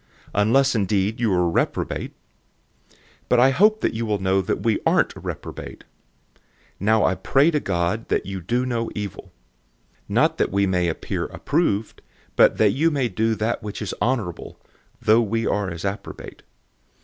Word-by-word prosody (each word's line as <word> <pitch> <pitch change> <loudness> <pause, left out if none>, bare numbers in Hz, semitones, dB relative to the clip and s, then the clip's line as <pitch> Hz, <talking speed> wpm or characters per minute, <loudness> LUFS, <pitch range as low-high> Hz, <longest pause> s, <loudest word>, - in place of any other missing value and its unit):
unless 120 +7 +3
indeed 105 0 0
you 115 -4 +1
are 90 -1 +2
disqualified. - - -1 0.8
013:006 - - -28 0.3
But 125 - +4
I 130 +2 +6
hope 215 +8 +3
that - - 0
you 115 0 -3
will 105 -1 +1
know 95 0 +1
that 95 - -3
we 115 -2 +1
aren't - - +3
disqualified. - - -8 0.5
013:007 - - -34 0.4
Now 110 +3 +3
I - - +2
pray 140 - +2
to 150 - +1
God 90 +1 -1
that - - 0
you 95 -1 -5
do 120 +8 -1
no 115 -2 -2
evil; 105 -3 -6 0.8
not - - +2
that - - +1
we 100 +1 +2
may 90 -2 +1
appear 80 - -3
approved, 135 - -1 0.3
but - - +5
that 105 -2 +4
you 155 +10 +2
may 135 -6 0
do 110 +3 0
that 110 +3 -2
which 105 -1 -6
is 105 -4 -4
honorable, 110 -10 -2 0.4
though 110 +2 +4
we 115 +1 -1
are 100 -2 0
as 85 -2 -7
reprobate. 100 +1 -6
110 Hz, 170 wpm, -23 LUFS, 95-120 Hz, 0.8 s, I